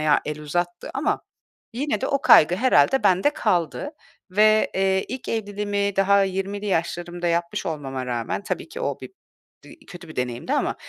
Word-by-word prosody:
ya 155 -1 +3
el 150 0 -5
uzattı 175 +3 -3
ama 270 +3 -1 0.5
yine 280 +4 -2
de 265 - -1
o 275 -1 0
kaygı 170 - +6
herhâlde 240 - +3
bende 190 +6 +4
kaldı 180 - -1 0.4
ve, 215 +2 +4
eee, 190 0 +1
ilk 255 +1 -6
evliliğimi 205 -2 -2
daha 200 0 +4
20'li 195 +2 -3
yaşlarımda 175 -1 -2
yapmış 170 0 -1
olmama 135 -6 -4
rağmen, 120 - -3
tabii - - -4
ki - - -7
o - - -2
bir - - -9 0.5
bir 300 - -16
kötü 175 -2 -11
bir 155 - -11
deneyimdi 125 -1 -3
ama - - 0
190 Hz, 165 wpm, -23 LUFS, 165-210 Hz, 0.5 s, kaygı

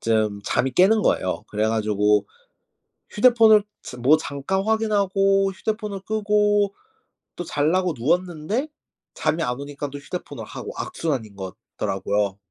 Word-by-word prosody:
좀 110 -2 0
잠이 130 0 0
깨는 205 - +4
거예요. 95 - 0
그래 105 +1 0
가지고 105 -1 +2 0.8
휴대폰을 225 -2 +6 0.2
저 - - -9
뭐 135 +6 +5
잠깐 155 +5 -2
확인하고 195 -3 +2
휴대폰을 210 0 -4
끄고 205 -1 +1 0.6
또 175 - -4
자려고 170 +3 +1
누웠는데 175 - -1 0.5
잠이 165 +1 0
안 125 -1 -2
오니까 145 0 -6
또 145 - -7
휴대폰을 145 +6 -7
하고 - - -7
악순환인 135 - -3
것 95 0 -7 0.2
더라고요. 100 0 -1
165 Hz, 295 characters per minute, -23 LUFS, -, 0.8 s, 휴대폰을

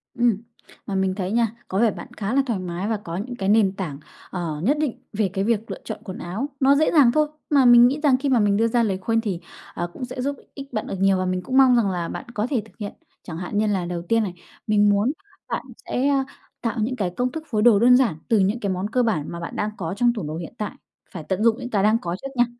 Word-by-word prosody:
Ừm. 235 -4 +3 0.5
Mà 200 - -3
mình 190 -1 +1
thấy 190 -1 -3
nha, 235 0 +3 0.2
có 190 - -1
vẻ 230 -1 +4
bạn - - -9
khá 205 +2 -2
là 275 - +4
thoải 230 -7 -1
mái 180 +2 -4
và 225 - 0
có 170 -5 -6
những 245 +6 -5
cái 195 -4 -2
nền 210 -3 +4
tảng, 170 -8 -4 0.3
ờ, 165 -5 -4
nhất 280 +9 +2
định 300 -6 -1
về 210 -1 +1
cái 195 -1 0
việc 225 0 0
lựa - - -4
chọn - - -6
quần 185 - -7
áo, 200 +11 -4
nó 275 +1 +5
dễ 310 +2 +3
dàng 280 -7 +6
thôi. 305 +2 +2 0.2
Mà 280 -3 +4
mình 240 0 +8
nghĩ 280 +4 -1
rằng 275 -4 +5
khi 275 +2 -1
mà 255 -3 +4
mình 205 -1 +3
đưa 225 +1 +3
ra 235 +1 +2
lời 195 -4 0
khuyên 225 +4 0
thì, 200 -6 -3 0.3
ờ, 175 - -3
cũng 250 +8 -7
sẽ 250 +1 -6
giúp 280 +2 -1 0.2
ích 275 -2 -10
bạn 215 - -2
được - - -3
nhiều 195 -1 +4
và 185 - -1
mình 185 0 -1
cũng 255 +8 -1
mong 260 -2 +7
rằng 225 -5 +3
là 175 -2 -2
bạn - - -6
có 215 0 -1
thể 250 -7 +1
thực 220 - -21
hiện. 205 -2 -5 0.3
Chẳng 160 -2 -7
hạn 180 +3 -4
như 215 +1 +2
là 195 -4 0
đầu 175 -1 -3
tiên 225 +6 +1
này, 190 -4 -4 0.3
mình 210 -1 +4
muốn 205 +6 +2 0.4
bạn - - -3 0.2
sẽ, 260 +3 +1
ơ, 275 -1 +2 0.4
tạo 230 0 -2
những 230 +4 0
cái 195 -7 -1
công 245 +8 -2
thức 320 -1 -6
phối 215 -4 0
đồ 225 -3 +6
đơn 245 +3 +7
giản 245 -10 +2
từ 225 - +3
những 200 +5 +1
cái 200 -4 -1
món 185 +2 -2
cơ 250 +3 +2
bản 205 -11 0
mà 170 - -6
bạn 170 - -6
đang 210 - -1
có 170 0 -3
trong 240 +1 +3
tủ 220 - -5
đồ 150 +1 -4
hiện 165 - -7
tại, 210 - -3 0.4
phải 170 -5 -7
tận 190 +6 -1
dụng 230 -1 +4
những 245 -1 -5
cái 205 -5 +1
đang 215 +2 +4
có 170 0 -3
trước 270 - -4
nha. 240 -1 +4
215 Hz, 285 wpm, -23 LUFS, 190-245 Hz, 0.5 s, mình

